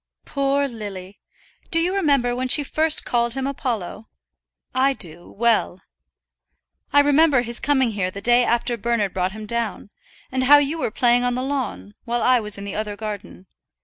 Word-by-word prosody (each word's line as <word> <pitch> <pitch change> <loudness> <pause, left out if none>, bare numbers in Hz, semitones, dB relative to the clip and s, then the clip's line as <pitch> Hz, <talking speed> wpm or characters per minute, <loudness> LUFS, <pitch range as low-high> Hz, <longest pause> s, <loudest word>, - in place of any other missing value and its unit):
"Poor 280 0 0
Lily! 200 -5 -8 0.5
Do 330 - +1
you 345 +3 +1
remember 280 -10 +1
when 255 +1 -2
she 290 +3 +5
first 310 +2 +1
called 235 0 0
him 265 -1 -2
Apollo? 235 -6 -4 0.6
I 265 +2 +2
do, 175 -7 -10
well. 225 -5 0 1.1
I 285 - +6
remember 290 -2 +4
his 235 0 -1
coming 265 -5 +1
here 195 -3 -2
the 195 - -8
day 240 +4 +3
after 240 0 0
Bernard 225 -3 -1
brought 185 0 -1
him 215 0 -8
down, 225 -2 -4 0.4
and 260 0 0
how 290 +3 +8
you 290 +3 0
were - - -1
playing 245 +1 +2
on 245 0 0
the 255 - -2
lawn, 250 - -4
while 240 0 -1
I 255 -1 +4
was 210 -2 -4
in 200 - -7
the 200 -1 -5
other 210 -1 -3
garden. 205 -3 -7
240 Hz, 180 wpm, -22 LUFS, 210-275 Hz, 1.1 s, how